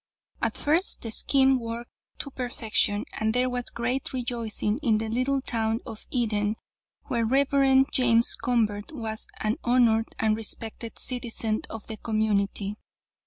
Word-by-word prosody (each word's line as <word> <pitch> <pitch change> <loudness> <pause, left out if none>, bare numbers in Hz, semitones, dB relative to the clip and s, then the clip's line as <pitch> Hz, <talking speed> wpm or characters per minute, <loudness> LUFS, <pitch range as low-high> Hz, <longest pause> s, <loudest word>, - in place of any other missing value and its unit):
"'At - - 0
first 325 +6 +1
the 225 - -4
scheme 265 +2 +3
worked 230 +1 -6 0.3
to 280 - -3
perfection, 225 -5 +1
and 220 +1 +1
there 250 0 +2
was 245 -1 -2
great 250 +3 -1
rejoicing 235 -3 -2
in 230 -7 +3
the 220 0 -2
little 255 +4 +1
town 225 -2 0
of 225 -3 -8
Eden, 215 -4 0 0.5
where 235 -2 -1
the - - +1
Rev. 270 +1 +4
James 235 -2 +4
Convert 215 -3 0
was 220 -4 -3
an 215 +1 0
honored 235 -2 +4
and 215 -1 +2
respected 225 +1 -4
citizen 230 -3 -1
of 225 - -7
the 220 - -5
community. 210 -2 0
230 Hz, 145 wpm, -27 LUFS, 220-250 Hz, 0.5 s, Rev